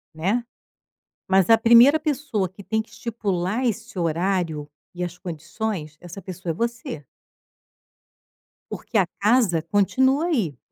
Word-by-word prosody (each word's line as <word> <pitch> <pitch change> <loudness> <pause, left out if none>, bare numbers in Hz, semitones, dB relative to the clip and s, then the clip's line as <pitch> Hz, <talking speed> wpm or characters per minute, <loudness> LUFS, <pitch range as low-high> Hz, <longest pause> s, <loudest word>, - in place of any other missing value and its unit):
Né. 195 +10 0 0.8
Mas 190 -1 +3
a 225 - +8
primeira 235 +7 +7
pessoa 280 - -1
que 190 +3 -14
tem 220 +3 0
que 220 - -15
estipular 210 0 -2
esse 225 -2 -3
horário 165 -2 -1 0.2
e 180 0 -4
as 175 0 -5
condições, 170 -1 -5
essa 175 +2 -10
pessoa 180 -1 -5
é - - -3
você. 230 -9 -4 1.7
Porque 230 - -3
a 195 - +4
casa 210 -6 +3
continua 260 - +2
aí. 210 - -1
200 Hz, 130 wpm, -23 LUFS, 175-235 Hz, 1.7 s, a